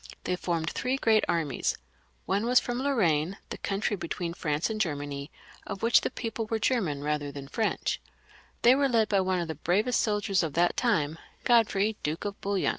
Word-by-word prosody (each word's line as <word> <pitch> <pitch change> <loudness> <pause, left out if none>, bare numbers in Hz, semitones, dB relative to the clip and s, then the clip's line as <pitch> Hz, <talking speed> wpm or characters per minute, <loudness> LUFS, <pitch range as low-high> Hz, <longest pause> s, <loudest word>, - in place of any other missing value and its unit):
They 180 - 0
formed 170 -2 -2
three 255 +2 -1
great 220 -4 +3
armies; 155 -6 0 0.5
one 205 +4 0
was 250 +1 +6
from 245 +1 -3
Lorraine, 190 - +1
the - - -6
country 205 +1 -1
between 170 -1 -4
France 150 -2 -1
and 215 -1 -2
Germany, 145 -4 -3 0.4
of 200 0 -6
which 230 +1 +5
the - - -1
people 225 -1 -4
were 225 - 0
German 195 - 0
rather 150 -1 -1
than 140 -1 -8
Frencih; 220 +10 -1 0.6
they 240 - +8
were 275 +1 +2
led 225 -3 +2
by 200 - +3
one 185 -1 0
of 170 - -2
the 160 - -3
bravest 195 - +1
soldiers 205 -3 +1
of 160 -4 -2
that 175 +1 +3
time, 165 -10 +1 0.2
Godfrey, 220 -3 +3
Duke 155 +6 -3
of 200 -1 -5
Bouillon. 200 -1 0
195 Hz, 190 wpm, -28 LUFS, 160-225 Hz, 0.6 s, they